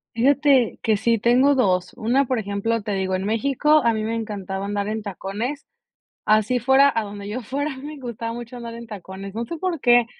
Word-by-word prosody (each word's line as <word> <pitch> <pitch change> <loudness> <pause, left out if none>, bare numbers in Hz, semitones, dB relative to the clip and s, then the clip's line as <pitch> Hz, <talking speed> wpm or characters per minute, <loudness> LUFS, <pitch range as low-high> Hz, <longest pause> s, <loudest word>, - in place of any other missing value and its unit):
Fíjate 270 0 +3
que 220 - +2
sí 230 +3 +2
tengo 255 +6 +4
dos. 185 -8 +1
Una, 245 +5 +2
por 255 -2 -1
ejemplo, 210 +2 -1
te 205 -1 -3
digo, 190 -1 -1
en 185 +1 -3
México 280 +7 +3
a 235 - +4
mí 220 - -2
me 225 - -1
encantaba 200 -4 -4
andar 205 0 -2
en 220 0 -3
tacones, 205 - -4 0.6
así 215 +3 +3
fuera 270 +3 +5
a 225 - +1
donde 205 -1 -7
yo 240 +5 -4
fuera, 275 +4 -3
me 295 +2 -8
gustaba 235 -3 -5
mucho 240 +1 -8
andar 235 -1 -7
en 235 0 -9
tacones. 195 -1 -8
No 230 +2 -2
sé 335 +8 -6
por 355 -4 -2
qué. 240 -1 +5
230 Hz, 205 wpm, -23 LUFS, 205-260 Hz, 0.6 s, fuera